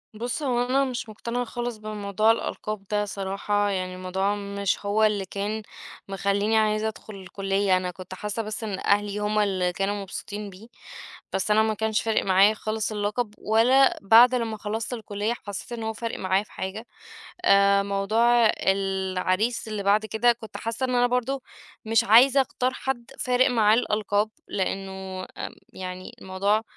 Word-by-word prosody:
بُص، 240 +7 -3
هو 245 -3 +1
أنا 265 +2 +2
مش 245 -3 -4
مقتنعة 235 +3 -3
خالص 240 0 -4
بموضوع 215 0 +1
الألقاب 215 -2 -3
ده 210 0 +1
صراحة، 200 +1 -1
يعني 185 -2 -2
الموضوع 190 +2 -1
مش 200 0 -2
هو 205 +2 +2
اللي 210 -2 +2
كان 205 +3 -4 0.4
مخليني 200 +2 +1
عايزة 215 0 +2
أدخل 215 -1 -8
الكلية. 195 0 0
أنا 180 0 -3
كنت 185 +1 -10
حاسة 210 +4 -3
بس 215 +1 -5
إن 200 -3 -3
أهلي 205 0 +1
هُم 210 +1 0
اللي 185 -3 +1
كانوا 195 +3 -1
مبسوطين 205 +1 -6
بيه، 195 +4 -13 0.7
بس 190 +2 0
أنا 215 +1 +5
ما 220 0 +1
كانش 220 0 0
فارق 225 -1 +1
معايا 195 +2 +5
خالص 215 0 -3
اللقب، 210 +2 -2
ولا 245 +5 +4
بعد 230 +5 +7
لما 230 -3 -2
خلصت 220 +3 -4
الكلية 215 -1 -2
حسيت 205 +4 -6
إن 235 -1 -4
هو 220 0 -2
فارق 230 +1 -5
معايا 190 +2 +1
في - - -22
حاجة. 200 +5 -5 0.6
آآ، 200 - +5
موضوع 220 +4 +3 0.2
العريس 190 +3 0
اللي 210 -2 -4
بعد 205 +2 +3
كده، 225 +2 +3
كنت 220 -2 -10
حاسة 230 +3 -4
إن 255 -1 -1
أنا 245 0 +4
برضو 250 +2 -1 0.4
مش 225 +1 +3
عايزة 250 +5 +6
أختار 255 -1 -1
حد 250 -3 -4
فارق 250 0 +3
معاه 215 -3 +4
الألقاب، 210 -2 0 0.2
لأنه، 190 -1 -4
آآ، - - -8 0.2
يعني 185 0 -7
الموضوع 200 +3 0
210 Hz, 165 wpm, -25 LUFS, 195-225 Hz, 0.7 s, بعد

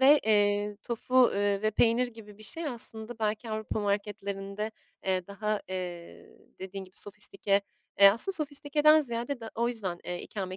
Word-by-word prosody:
ve, 285 +3 +7
eee, 205 -1 +2
tofu, 250 +2 +3
eee, 200 0 +1
ve 215 - +2
peynir 235 +3 +3
gibi 215 -3 -13
bir - - -13
şey 325 +8 -3
aslında 230 -3 -2
belki 220 +1 -2
Avrupa 215 0 -3
marketlerinde, 200 0 -3 0.4
eee, 185 -2 0
daha, 210 +1 -2
eee, 180 -2 -7 0.2
dediğin 190 +1 -6
gibi 185 0 -17
sofistike 200 0 0 0.4
eee, 200 - +11
aslında 235 - 0
sofistikeden 300 +1 +4
ziyade 240 0 -3
da 225 -1 -7
o 235 +1 +1
yüzden, 200 -8 -2
eee, 175 0 -4
ikame 185 -3 -5
215 Hz, 160 wpm, -29 LUFS, 200-235 Hz, 0.4 s, eee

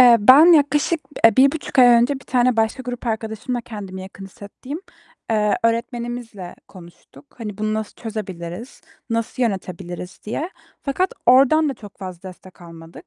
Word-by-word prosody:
Eee, 245 -2 +8
ben 265 +9 +8
yaklaşık, 295 +2 +2 0.2
eee, 225 -2 +6
1.5 275 +2 +2
ay 250 - +9
önce, 240 +3 +5
bir 270 - -10
tane 250 -1 +2
başka 225 +4 0
grup 245 0 -6
arkadaşımla, 220 +2 -3
kendimi 200 -5 -8
yakın 195 +1 -11
hissettiğim, 240 - -9 0.5
eee, 210 -1 +2
öğretmenimizle 235 -4 -3
konuştuk. 175 - -16
Hani 210 -3 -7
bunu 215 0 -1
nasıl 215 -1 -4
çözebiliriz, 205 -2 -7 0.3
nasıl 230 +3 -2
yönetebiliriz? 185 -4 -4
diye. 300 - -4 0.3
Fakat 365 +7 -1
oradan 275 +5 +5
da 275 - -3
çok 210 -4 -14
fazla 185 -1 -8
destek 185 0 -15
almadık. 165 -1 -13
230 Hz, 145 wpm, -21 LUFS, 195-255 Hz, 0.5 s, ay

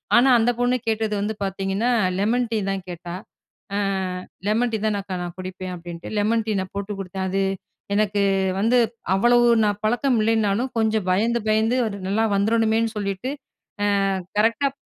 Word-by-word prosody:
ஆனா 255 +3 +6
அந்த 240 +2 +3
பொண்ணு 245 +1 +2
கேட்டது 220 -1 0
வந்து 215 +2 -1
பாத்தீங்கன்னா 195 +4 -1 0.3
லெமன் 235 +4 +1
டீ 225 - +1
தான் 190 -2 -3
கேட்டா. 175 0 -7 0.6
அ - - 0 0.7
"லெமன் 230 +3 +1
டீ - - +2
தான் 210 -2 +1
அக்கா 190 -1 -5
நான் 175 0 -6
குடிப்பேன்." 185 0 -6
அப்டின்ட்டு 170 0 -8
லெமன் 220 +2 +2
டீ - - 0
நான் 185 0 -5
போட்டு 200 +1 -3
கொடுத்தேன் 190 0 -4
அது 195 +1 0 0.5
எனக்கு 205 -1 +1 0.4
வந்து 230 +4 +3 0.4
அவ்வளவு 240 +4 +4 0.2
நான் 205 -1 0
பழக்கம் 245 +3 +2
இல்லைன்னாலும் 220 +2 +1
கொஞ்சம் 220 -3 +1
பயந்து, 230 +5 +2
பயந்து 220 +3 +2
அது 200 -1 -5
நல்லா 220 +3 +1
வந்துறணுமேன்னு 225 +2 +2
சொல்லிட்டு 200 +5 -3 0.8
அ - - -1 0.2
கரெக்ட்டாப் 260 +5 +2
215 Hz, 155 wpm, -23 LUFS, 195-230 Hz, 0.8 s, ஆனா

